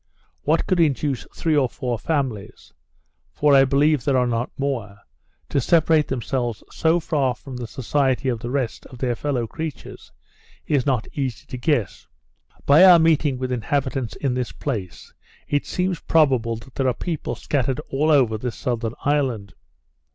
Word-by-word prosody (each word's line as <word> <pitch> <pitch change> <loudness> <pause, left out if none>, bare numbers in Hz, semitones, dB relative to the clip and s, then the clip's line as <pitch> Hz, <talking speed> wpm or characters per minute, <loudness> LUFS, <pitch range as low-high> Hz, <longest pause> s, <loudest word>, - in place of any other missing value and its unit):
What 160 +3 +1
could 185 - +1
induce 145 -4 +1
three 160 -2 0
or 135 -4 +3
four 125 -4 -3
families 135 -10 -3 0.6
(for 150 -1 +2
I 135 -1 +7
believe 140 0 +2
there 140 -2 +2
are 125 - +3
not 120 0 -1
more) 120 -8 -3 0.5
to 140 - +1
separate 160 +1 +3
themselves 120 -2 -3
so 165 +2 +2
far 140 -6 0
from 130 +1 -10
the 120 -1 -5
society 130 +2 0
of 120 -3 0
the 120 - -5
rest 130 -4 -3
of 125 - -12
their 125 -1 -1
fellow 130 -3 -2
creatures, 160 +5 -7 0.5
is 140 -4 0
not 125 -5 0
easy 135 -5 -3
to - - -8
guess. 125 - -1 0.6
By 145 +6 +7
our 180 -2 +9
meeting 155 -4 +2
with 130 0 -3
inhabitants 130 +1 -2
in 135 -3 -1
this 125 -1 -2
place, 105 - -5 0.3
it 145 -1 -1
seems 180 -2 -1
probable 130 -8 +2
that 120 +3 -12
there 135 - 0
are 125 - +1
people 165 -4 -4
scattered 135 -2 -1
over 145 -2 +4
all - - -1
this 120 0 -4
southern 120 -2 -3
island. 130 -9 0
135 Hz, 165 wpm, -22 LUFS, 120-150 Hz, 0.6 s, our